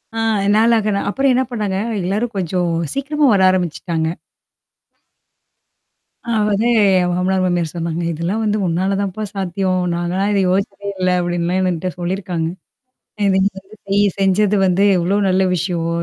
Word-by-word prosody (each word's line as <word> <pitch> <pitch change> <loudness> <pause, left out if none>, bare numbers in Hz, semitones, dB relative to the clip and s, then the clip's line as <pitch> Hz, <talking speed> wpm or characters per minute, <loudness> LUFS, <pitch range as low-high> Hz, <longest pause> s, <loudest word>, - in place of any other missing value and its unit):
ஆ - - -2 0.4
நாளு 230 +2 +4
ஆக 215 -1 0
நா - - 0
அப்புறம் 270 +4 +1
என்ன 260 +1 +2
பண்ணாங்க 205 -5 -2 0.3
எல்லாரும் 210 +6 -2
கொஞ்சம் 180 -1 -1 0.2
சீக்கிரமா 290 +2 0
வர 195 - +3
ஆரம்பிச்சுட்டாங்க. 170 -2 -1 2.2
அதாவது, 215 -1 +1 0.3
என் 180 0 +1
மாமனார் 185 +1 0
மாமியார் 175 -3 -1
சொன்னாங்க 170 0 -3
இதெல்லாம் 170 +7 -2
வந்து 210 0 +1
உன்னால 185 +4 0
தான்ப்பா 200 +2 -3
சாத்தியம். 185 -1 -1
நாங்க 175 +1 -2
எல்லாம் 200 +2 0
இத 200 - +2
யோசிச்சதே 200 +1 -2
இல்ல 185 0 +1
அப்பிடின்லாம் 175 +1 -1
என்கிட்ட 180 +1 -2
சொல்லிருக்காங்க. 175 -2 -2 0.8
இதெல்லாம் 190 0 +2
வந்து 215 +3 -16
நீ 200 - +2 0.2
செஞ்சது 200 +2 +2
வந்து 185 +2 +2
எவ்ளோ 180 +4 +1
நல்ல 185 +1 +2
விஷயம். 175 -2 -2
190 Hz, 140 wpm, -18 LUFS, 175-205 Hz, 2.2 s, நாளு